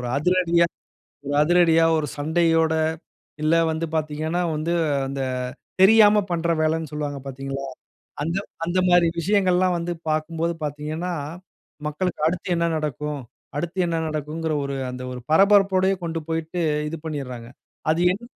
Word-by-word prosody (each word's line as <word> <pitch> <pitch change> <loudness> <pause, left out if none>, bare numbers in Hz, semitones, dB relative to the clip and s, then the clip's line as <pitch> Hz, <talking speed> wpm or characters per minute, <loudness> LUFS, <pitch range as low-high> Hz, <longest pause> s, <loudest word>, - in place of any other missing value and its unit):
ஒரு 125 - -4
அதிரடியா 170 +2 +3 0.6
ஒரு 145 - -2
அதிரடியா 165 0 +4
ஒரு 155 -1 0
சண்டையோட, 160 +1 +2 0.7
இல்ல 155 +2 +3 0.2
வந்து 160 +1 -2
பாத்தீங்கன்னா 155 +3 -1
வந்து 155 +3 -1 0.4
அந்த 135 0 -4 0.6
தெரியாம 210 +1 +7
பண்ற 170 -1 0
வேலைன்னு 160 0 0
சொல்லுவாங்க 145 -1 -3
பாத்தீங்களா? 135 0 -5 0.6
அந்த 165 +4 -2 0.3
அந்தமாரி 175 0 +3
விஷயங்கள்லாம் 185 -1 +2
வந்து 170 +1 -3 0.2
பார்க்கும்போது 160 +2 -1
பாத்தீங்கன்னா, 150 +4 -4 0.8
மக்களுக்கு 155 +4 -2
அடுத்து 180 +3 -4
என்ன 170 0 +1
நடக்கும் 150 -1 -3 0.4
அடுத்து 170 +5 -3
என்ன 170 -1 -1
நடக்குங்கிற 155 +1 -3
ஒரு 140 0 -3 0.2
அந்த 125 0 -7
ஒரு 125 - -6
பரபரப்போடயே 195 +1 +5
கொண்டு 165 -1 -3
போயிட்டு 165 +2 -2 0.3
இது 165 - -4
பண்ணிர்றாங்க. 130 -7 -5 0.4
அது 160 +2 +1
என் 195 +5 -7
165 Hz, 125 wpm, -23 LUFS, 150-175 Hz, 0.8 s, தெரியாம